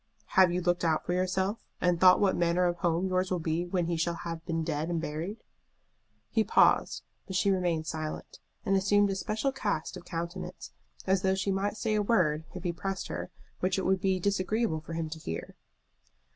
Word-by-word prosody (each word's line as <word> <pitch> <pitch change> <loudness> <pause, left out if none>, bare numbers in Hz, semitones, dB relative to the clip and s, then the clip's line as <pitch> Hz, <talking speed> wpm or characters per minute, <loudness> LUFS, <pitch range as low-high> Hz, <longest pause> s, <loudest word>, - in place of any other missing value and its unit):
"Have 185 -2 +6
you 180 +1 0
looked 175 0 +1
out 160 -2 +1
for 175 - -1
yourself, 190 +3 0 0.2
and 180 -1 +2
thought 185 -1 +8
what 200 -2 +3
manner 175 +1 +2
of 175 0 0
home 170 0 +1
yours 185 0 0
will 185 - 0
be 165 +1 -1
when 175 -1 0
he 170 0 -1
shall 170 +1 0
have 165 -1 -6
been 165 -1 -1
dead 155 +1 -2
and 170 -1 0
buried?" 165 +8 -5 0.9
He 220 - +3
paused, - - +3 0.2
but 190 - -5
she 195 +2 +3
remained 175 -4 0
silent, 155 -1 -5 0.3
and 195 - +2
assumed 200 +1 +3
a - - -1
special 215 +7 -1
cast 205 - -2
of - - -9
countenance, 170 +1 -6 0.3
as 190 0 +2
though 190 -1 +2
she 190 +1 -1
might 200 +2 -1
say 220 0 -1
a 210 - +2
word, 165 -8 +2
if 180 - -6
he 175 -2 -1
pressed 190 +2 -4
her, - - -4 0.3
which 185 +2 0
it 190 - -1
would 190 0 +2
be 190 -1 +1
disagreeable 200 -2 0
for 165 - -8
him 165 -1 -2
to 160 +1 -7
hear. 80 - -6
180 Hz, 205 wpm, -29 LUFS, 165-195 Hz, 0.9 s, thought